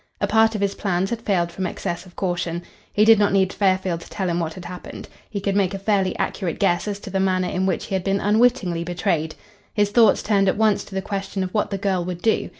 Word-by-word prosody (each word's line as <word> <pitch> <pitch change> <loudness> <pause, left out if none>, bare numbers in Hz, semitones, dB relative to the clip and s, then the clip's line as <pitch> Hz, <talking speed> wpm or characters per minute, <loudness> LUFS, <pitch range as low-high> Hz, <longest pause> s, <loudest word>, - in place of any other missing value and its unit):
A - - +1
part 225 0 +3
of 210 - -2
his 200 0 +1
plans 190 0 -1
had 235 -1 -3
failed 175 -6 0
from 185 +2 -3
excess 175 +1 -5
of 180 - -18
caution. 175 -2 -2 0.3
He 210 - +3
did 225 -1 +7
not 205 -1 +3
need 190 -1 +2
Fairfield 185 -3 +1
to - - -12
tell 190 -3 -3
him 170 0 0
what 165 -1 -3
had 180 - -9
happened. 180 - -8 0.2
He 205 - -3
could 195 0 -1
make 195 -1 +1
a - - -2
fairly 195 -1 0
accurate 180 -5 -2
guess 175 0 +1
as 205 -1 -2
to 195 - -8
the 190 - 0
manner 185 -1 +1
in 190 +1 -1
which 185 - -1
he - - -6
had 190 -1 0
been 195 +1 +1
unwittingly 205 -6 +2
betrayed. 170 -2 -1 0.4
His 205 -1 +2
thoughts 225 -2 +4
turned 200 -2 +3
at - - 0
once 215 -2 +2
to 195 - -10
the 190 - -2
question 195 -1 -3
of 185 - -5
what 210 - 0
the 195 - -2
girl 190 -2 0
would 175 0 -6
do. 225 - +1
190 Hz, 255 wpm, -22 LUFS, 180-205 Hz, 0.4 s, did